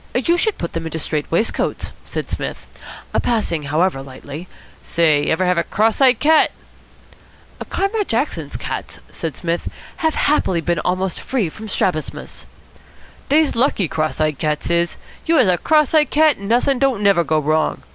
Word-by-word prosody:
"You 270 +8 +2
should 425 +4 0
put 170 - -5
them 165 0 -3
into 160 0 -4
strait 155 -1 -3
waistcoats," 175 +7 -1
said - - -4
Psmith. - - -5 0.6
"Passing, 215 -9 0
however, 155 -1 +1
lightly 140 +5 -9 0.2
" - - -26
"Say, 155 -3 +2
ever 185 +3 +1
have 180 -1 +2
a - - +1
cross 220 +8 +1
eyed 260 -2 +5
cat?" 310 +1 +5 1.2
"Comrade 400 +1 -1
Jackson's 225 - -2
cats," - - -5
said 160 -3 -5
Psmith, 170 -1 -2 0.3
"have 320 -1 0
happily 235 - +2
been 170 0 -1
almost 185 +2 -1
free 235 -10 -1
from 220 +7 -10
strabismus." 180 -5 -3 0.8
"Dey's 305 +1 +3
lucky, 230 - +2
cross 155 0 -2
eyed 155 -2 0
cats 150 +1 -1
is. 170 0 +1 0.3
You 330 - +3
has 255 -9 +5
a 180 -2 +2
cross 305 -2 +3
eyed 300 -3 +4
cat, 305 -3 +4
and 200 +1 -7
not'in' 250 +3 +2
don't 260 -6 +1
never 195 -4 +4
go 155 0 +1
wrong. 155 +1 0
185 Hz, 165 wpm, -19 LUFS, 160-270 Hz, 1.2 s, eyed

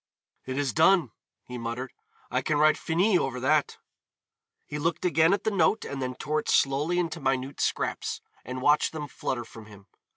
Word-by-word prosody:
"It 130 0 -3
is 140 -2 0
done," 165 - +4 0.3
he 125 -1 -8
muttered. 115 +2 -5 0.4
"I - - +1
can 155 - 0
write 155 +1 +5
Finis 180 +4 +2
over 130 -1 -2
that." 145 +3 +1 0.9
He 150 - -5
looked 165 +3 -1
again 165 -1 +4
at 200 0 +1
the 220 - 0
note 195 +2 +2
and 140 -1 -5
then 130 -1 -3
tore 155 +4 -1
it - - -5
slowly 145 +6 +2
into 170 -1 -1
minute 135 0 -1
scraps, - - -1 0.2
and 130 +1 -6
watched 150 +2 +3
them 150 -2 -5
flutter 120 -3 -4
from 110 -1 -12
him. 100 -2 -15
145 Hz, 185 wpm, -27 LUFS, 130-165 Hz, 0.9 s, write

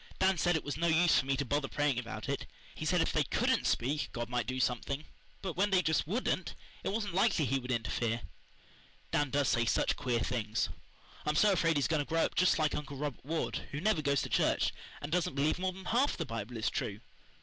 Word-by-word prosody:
"Dan 190 -2 +3
said 175 +1 +3
it 160 - -1
was 145 - -4
no 170 +1 +1
use 170 +1 +5
for 130 - -2
me 135 -1 +1
to 140 - -1
bother 145 +2 0
praying 145 -4 +1
about 120 -1 -6
it. - - -2 0.3
He - - -6
said - - +3
if - - 0
they - - +3
COULDN'T - - +1
speak 145 +5 0
God 120 -1 -4
might 120 -3 -1
do 130 +1 -2
something, 135 +4 -1 0.4
but 185 -4 -3
when 200 +3 +2
they 185 -2 +3
just 160 -1 +1
WOULDN'T 225 +9 -1 0.3
it - - -1
wasn't 205 -2 -2
likely 175 -4 +3
He 135 +2 +1
would 125 0 -9
interfere. 115 -1 -1 0.9
Dan 145 -1 +1
does 140 0 +1
say 115 - +3
such 115 - +1
queer 125 -4 0
things. 115 -3 -1 0.5
I'm 150 - 0
so 205 +6 +5
afraid 165 -3 +2
he's 145 - +2
going 155 -2 +1
to - - -17
grow 165 0 +3
up - - -3
just 185 - +4
like 155 -2 +1
Uncle 145 -1 -4
Robert 145 -2 -4
Ward, 160 +4 -2
who 145 - -2
never 200 -2 +2
goes 140 -2 +1
to - - -4
church, - - +2 0.3
and 145 - -5
doesn't 175 -5 0
believe 145 +4 +1
more 185 0 0
than 190 0 -11
half 250 +8 +2
the 165 - -2
Bible 115 -1 -5
is 110 - 0
true." 100 +1 -3
145 Hz, 235 wpm, -32 LUFS, 125-170 Hz, 0.9 s, use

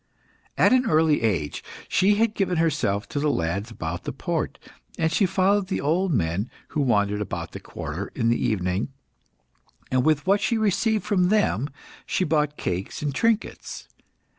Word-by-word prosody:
At - - +5
an 255 -1 +3
early 155 -1 +3
age, 90 -10 -1 0.2
she 200 +3 +3
had 220 +1 +2
given 185 -4 0
herself 135 -11 +1
to 145 - -2
the 150 +1 +1
lads 95 - -1
about 85 -6 -5
the - - -2
port, - - -3 0.4
and 160 0 +1
she 190 +3 +3
followed 190 +1 +2
the 190 - -1
old 175 +6 +1
men 100 - 0 0.2
who 150 - -1
wandered 105 -5 +2
about 105 - -4
the - - -7
quarter 85 +7 -6
in 115 -3 0
the 120 - +1
evening, 95 +1 0 1.0
and 130 -1 +2
with 155 0 +2
what 200 +2 +3
she 230 - +1
received 220 +1 +1
from 185 -4 +2
them 170 - +2 0.4
she - - +1
bought 150 -3 +1
cakes 90 +10 -3
and 145 -2 -1
trinkets. 225 - -1
150 Hz, 165 wpm, -25 LUFS, -, 1.0 s, At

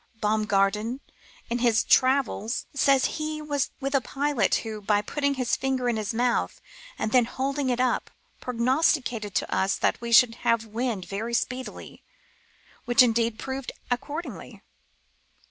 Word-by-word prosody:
Baum 215 0 +1
garten, 210 +4 +1 0.5
in 240 - -2
his 235 -3 +3
Travels," 255 -3 +2
says 275 -1 +3 0.2
he 310 0 -3
was 290 -2 -1
with 275 0 -3
a 275 - +3
pilot 280 0 0
who, 215 -1 -5
by 205 0 +2
putting 280 +6 -1
his 255 -3 0
finger 260 -2 -1
in 240 - +1
his 215 -1 -2
mouth, 240 +1 0 0.4
and 215 - -2
then 250 -1 +5
holding 270 +2 -2
it 245 -1 0
up, 255 -1 0 0.3
''prognosticated 250 - 0
to - - -1
us 190 +1 +1
that - - 0
we 235 0 -5
should 235 -1 +6
have 230 -1 +2
wind 220 -3 -3
very 225 +4 -3
speedily, 255 +2 -4 0.8
which 245 +2 +6
indeed 230 -1 +1
proved 265 +2 -5 0.2
accordingly." 290 +7 -5
245 Hz, 145 wpm, -26 LUFS, 220-270 Hz, 0.8 s, should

